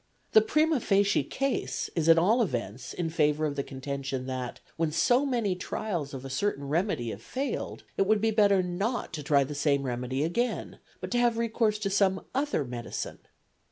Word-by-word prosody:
The 220 - +7
primâ 310 +7 +2
facie 200 0 +3
case 275 0 -2
is 165 -1 +1
at 165 - +8
all 210 +9 +4
events 120 - -3
in 165 -2 -3
favour 150 -1 +2
of 145 -2 -2
the 140 - 0
contention 135 -1 -4
that, 130 -2 -4 0.2
when 165 -1 0
so 250 - +3
many 235 -7 +1
trials 180 -4 -3
of 135 0 -7
a - - -5
certain 140 -2 -1
remedy 150 - 0
have 100 - -8
failed, 270 - -4
it 195 - +2
would 215 0 +4
be 225 +1 +2
better 200 -3 +4
not 195 +5 -2
to 155 - -4
try 140 -1 +3
the 140 +2 -5
same 140 -1 +1
remedy 125 +2 -2
again, 235 +10 -2 0.2
but - - -5
to 245 - +2
have 240 -1 +3
recourse 225 -2 +1
to 200 -2 -2
some 190 -1 +2
other 275 - 0
medicine. 120 -1 -5
175 Hz, 190 wpm, -28 LUFS, 140-220 Hz, 0.2 s, at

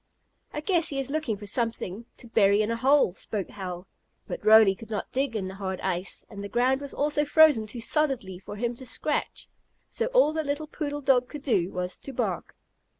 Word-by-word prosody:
"I 300 - -4
guess 345 0 +2
he 275 - -2
is 270 0 -2
looking 300 -9 -1
for 205 - -9
something 225 -1 -2
to 240 - -11
bury 205 -2 +4
in 215 - -1
a - - 0
hole," 265 -4 +3
spoke 195 -1 -5
Hal. 180 -2 -6 0.4
But - - -6
Roly 215 -2 +7
could 225 +3 -12
not 210 -2 -4
dig 265 -2 -1
in 195 -3 -2
the 190 - -7
hard 190 -1 -4
ice, 185 0 -3
and 200 0 -8
the 200 - -6
ground 255 +4 +2
was 280 - -5
also 295 +1 0
frozen 295 -7 +5
too 230 +2 -5
solidly 235 - 0
for 195 - -9
him 240 +3 -2
to 260 - -9
scratch. 295 +5 -2 0.4
So 470 - -1
all - - +4
the 315 0 -1
little 285 +1 -2
poodle 290 -1 -4
dog 260 -2 +3
could 295 -2 -8
do 195 -9 +1
was 180 0 -4
to 275 - -8
bark. - - -3
235 Hz, 210 wpm, -27 LUFS, 200-285 Hz, 0.4 s, Roly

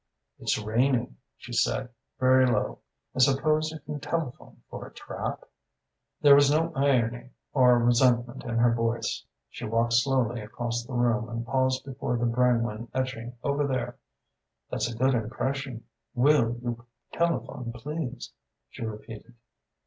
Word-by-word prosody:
"'It's - - 0
raining,' 115 - +1 0.2
she - - -10
said, - - +1 0.3
very 130 0 +5
low. 125 - 0 0.3
'I - - -4
suppose 155 +4 +3
you 160 - -7
can 145 0 -6
telephone 145 -2 -4
for - - -8
a - - -16
trap?' - - -5 0.8
"There 145 -1 +8
was 140 0 +6
no 165 +3 +2
irony 125 -3 +1 0.2
or 125 -3 +6
resentment 120 0 +2
in 115 -1 -3
her 120 0 +4
voice. 115 0 -1 0.2
She - - -10
walked 115 +1 +1
slowly 120 -1 +2
across 120 +2 -3
the 120 - -9
room 120 -1 +1
and 115 0 -4
paused 130 +1 +1
before 130 -2 -2
the 120 - 0
Brangwyn 115 -2 +1
etching 125 -2 -3
over 140 0 +1
there. 125 -2 -3 0.7
'That's 120 - -1
a 115 - -7
good 130 +2 +3
impression. 125 +2 -2 0.3
Will 120 -3 +3
you 120 -1 -4 0.3
telephone, 165 -8 -1
please?' 135 +1 -5 0.4
she - - -7
repeated. 110 +2 -8
125 Hz, 140 wpm, -27 LUFS, 115-135 Hz, 0.8 s, There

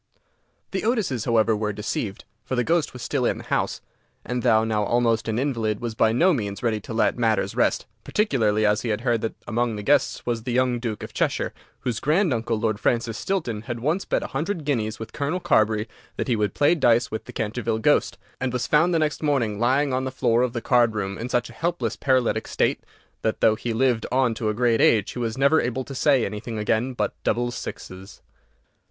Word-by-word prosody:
The 190 - -1
Otises, 210 - 0
however, 115 -1 +3
were 105 0 -1
deceived, 105 0 -4 0.2
for 130 - -3
the 125 - +1
ghost 165 +3 +1
was 125 -2 -9
still 130 +1 -1
in - - +1
the - - -9
house, - - -1 0.4
and 125 0 -2
though 110 -3 +4
now 110 -2 0
almost 115 +1 +1
an 110 0 -1
invalid, 115 -6 -1
was 120 -2 -4
by 110 0 +3
no 175 +11 +4
means 100 -6 -3
ready 110 -2 +1
to - - -10
let 115 - +1
matters 110 -3 +1
rest, - - +1 0.2
particularly 110 - +1
as 105 0 +2
he 120 - -3
heard 115 +1 0
that 115 - -3
among 120 0 0
the 105 - -5
guests 140 +3 +2
was 120 -2 -1
the 120 +1 -3
young 125 -1 +2
Duke 115 -3 -4
of - - -8
Cheshire, - - -1 0.3
whose 120 -4 -2
grand 160 +2 +2
uncle, 115 -1 -1
Lord 110 -2 0
Francis 115 -2 0
Stilton, 140 - -2
had 120 -2 -3
once 155 +10 0
bet - - -1
a - - -7
hundred 160 +3 -2
guineas 110 -7 -1
with 110 - -8
Colonel 145 +5 -1
Carbury 110 - +2 0.3
that - - -2
he 125 - +2
would 105 -2 -1
play 145 +3 +4
dice 120 -7 +3
with 110 - -4
the - - -9
Canterville 110 +1 -2
ghost, 110 - +2 0.2
and 130 0 -1
was 125 0 -1
found 165 +3 +3
the - - +4
next 155 -2 0
morning 125 -9 0
lying 130 +3 +2
on 130 +1 0
the 130 - -3
floor 120 -2 +2
of 125 -2 0
the 120 - -3
card 120 -3 +3
room 100 -2 -2
in 115 +4 -5
such 120 -1 0
a - - -12
helpless 160 -10 -2
paralytic 130 -3 +1
state - - 0 0.4
that, 110 - -1
though 110 - +5
he 115 +2 -4
lived 120 0 +1
on 130 -2 +2
to 110 -1 -2
a 105 - -1
great 120 -1 +2
age, 105 -3 +4
he - - -6
was 115 0 -2
never 140 +4 +4
able 125 +2 -2
to 135 - -9
say 135 -2 +3
anything 110 +2 -5
again 110 +4 0
but - - -1
"Double 120 0 0
Sixes." 95 -4 -8
120 Hz, 220 wpm, -24 LUFS, 110-130 Hz, 0.4 s, though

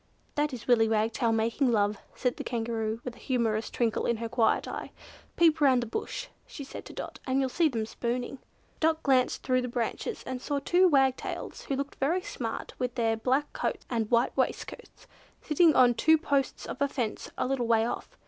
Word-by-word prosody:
"That 295 0 0
is 250 -4 -8
Willy 225 -3 +4
Wagtail 225 +1 +1
making 230 +4 +1
love," 205 -2 +1 0.2
said 250 -1 -1
the - - -4
Kangaroo, 225 -2 -2
with 250 - -5
a - - -16
humorous 225 -4 0
twinkle 230 -3 0
in 235 - +1
her 230 +1 -3
quiet 235 -1 +2
eyes. - - -5 0.5
"Peep 325 -2 +4
round 260 -4 +5
the - - -4
bush," - - -4 0.2
she 285 - -8
said 270 - -9
to - - -10
Dot, - - -7
"and 260 +1 +2
you'll 265 -1 +1
see 325 +4 +2
them 225 -5 -2
spooning." 245 +4 -3 0.4
Dot 320 0 +1
glanced 260 -3 +2
through 255 -1 +2
the 250 - -3
branches, 235 -2 -3
and 255 -1 -4
saw 290 +1 -1
two 355 +6 +4
wagtails, 270 -5 0
who 275 - -1
looked 280 +1 -5
very 335 +7 +1
smart 225 -3 -5
with 250 -1 -2
their 225 -2 +1
black 260 +6 0
coats - - -3
and 225 -3 0
white 235 +1 +2
waistcoats, - - -3 0.3
sitting 315 +1 +4
on 245 -1 +6
two 320 +7 +4
posts 280 -4 -1
of 260 - -7
a 280 - +4
fence 245 -6 -3
a - - 0
little 255 -2 -1
way 225 -1 +3
off. - - -5
250 Hz, 200 wpm, -29 LUFS, 230-280 Hz, 0.5 s, on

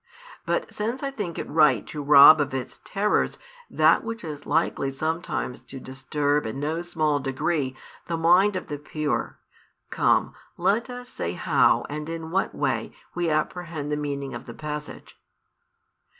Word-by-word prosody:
But - - -1
since 230 +6 -3
I 275 - -1
think 205 -11 -5
it - - -4
right 150 -7 +4
to 150 - -6
rob 145 +2 +9
of 140 -2 -2
its 130 -2 -5
terrors 205 +1 0 0.3
that - - +4
which 225 -1 -5
is 150 -3 -7
likely 145 -2 +1
sometimes 155 -2 -3
to 135 - -8
disturb 145 +2 -1
in 110 +5 -5
no 155 +4 -2
small 155 -4 0
degree 135 0 -1 0.3
the 170 - -1
mind 180 +5 +4
of 185 - -3
the 145 -2 -6
pure, 150 0 -3 0.5
come, - - +2 0.2
let 205 +8 +1
us 245 0 -7
say 85 - -4
how - - +3
and 150 +1 -5
in 165 -1 -5
what 190 +2 0
way - - -1 0.2
we 175 -1 -1
apprehend 155 -1 -2
the - - +1
meaning 140 -2 -4
of - - -8
the 115 - -8
passage. 150 -1 -7
155 Hz, 160 wpm, -25 LUFS, 145-175 Hz, 0.5 s, rob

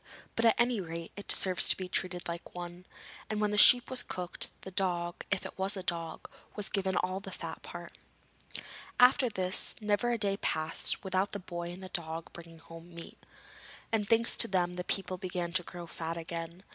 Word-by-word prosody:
But 230 - +1
at 225 - +6
any 240 -3 +2
rate, 165 -1 -6
it 205 - -9
deserves 185 -2 +7
to - - +3
be 185 - -4
treated 180 -1 -3
like 170 +1 -6
one,' 175 +1 -8 0.4
and 215 -1 -2
when 210 -1 +1
the - - 0
sheep 245 +3 +8
was 255 -1 +1
cooked, 180 -5 -2
the 190 - -9
dog 175 -2 -1
if 195 - -1
it - - -9
was 195 +2 +1
a 190 - -5
dog 165 -2 -4 0.3
was 210 -2 +1
given 190 -2 -1
all 185 +1 0
the 200 - -9
fat - - -7
part. - - -9 1.0
After 250 0 +6
this, 185 -3 0
never 210 +2 +1
a 240 - +1
day 200 -2 0
passed 155 -4 +1
without 190 +1 0
the 205 - -3
boy 175 -2 -6
and 180 +2 -8
the 185 - -7
dog 165 -1 -5
bringing 165 -1 -11
home 165 +1 -13
meat, 170 - -11 0.7
and 210 -3 0
thanks 230 0 +3
to 230 - +8
them 180 -3 +1
the 180 0 -4
people 185 -1 -3
began 180 -2 -3
to 185 - +3
grow 175 0 -8
fat 165 0 -5
again. 170 +2 -6
185 Hz, 200 wpm, -31 LUFS, 170-205 Hz, 1.0 s, sheep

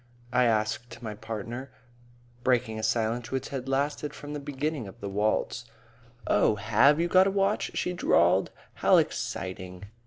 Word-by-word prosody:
I 125 0 +4
asked 115 +2 -1
my 110 -2 -4
partner, 115 +4 -6 0.7
breaking 120 -3 +1
a - - -3
silence 115 +1 0
which 130 0 -3
had 135 -1 -5
lasted 145 +2 -1
from 145 0 -8
the 150 - -3
beginning 145 -3 -3
of 95 - -12
the 100 - -5
waltz. 110 +4 0 0.6
"Oh, 105 - +3
have 135 +8 +4
you 170 - +2
got 185 +2 +5
a - - +3
watch?" 195 +1 +1
she 180 - -1
drawled. 95 - +3 0.3
"How - - +6
exciting!" 90 0 -3
120 Hz, 155 wpm, -28 LUFS, 110-145 Hz, 0.7 s, How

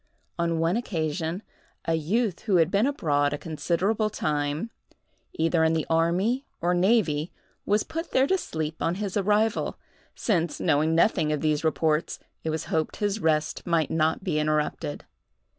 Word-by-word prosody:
On 170 -1 +1
one 165 +5 +1
occasion, 165 -3 -2 0.4
a 165 - +1
youth 180 +5 0
who 205 -4 0
had 165 0 +4
been 210 +5 +3
abroad 145 - +1
a - - -2
considerable 175 +8 0
time, 150 +4 -2 0.6
either 165 0 +2
in 160 0 +3
the 160 -2 0
army 180 +11 +2 0.2
or 175 +1 +1
navy, 175 -5 +2 0.4
was 210 +1 +3
put 330 +2 -5
there 260 - +3
to 380 - +2
sleep 160 - -4
on 170 - +1
his 200 -1 -4
arrival, 210 +2 +1 0.4
since, 170 -8 0
knowing 155 +3 +2
nothing 165 -3 +3
of 150 - -1
these 155 -1 +1
reports, 160 0 +1 0.3
it 160 - -2
was 160 0 -2
hoped 160 -1 -1
his 205 0 -1
rest 155 -2 0
might 165 -3 +1
not 160 +2 +1
be 160 -5 0
interrupted. 150 -1 -1
165 Hz, 160 wpm, -26 LUFS, 155-205 Hz, 0.6 s, had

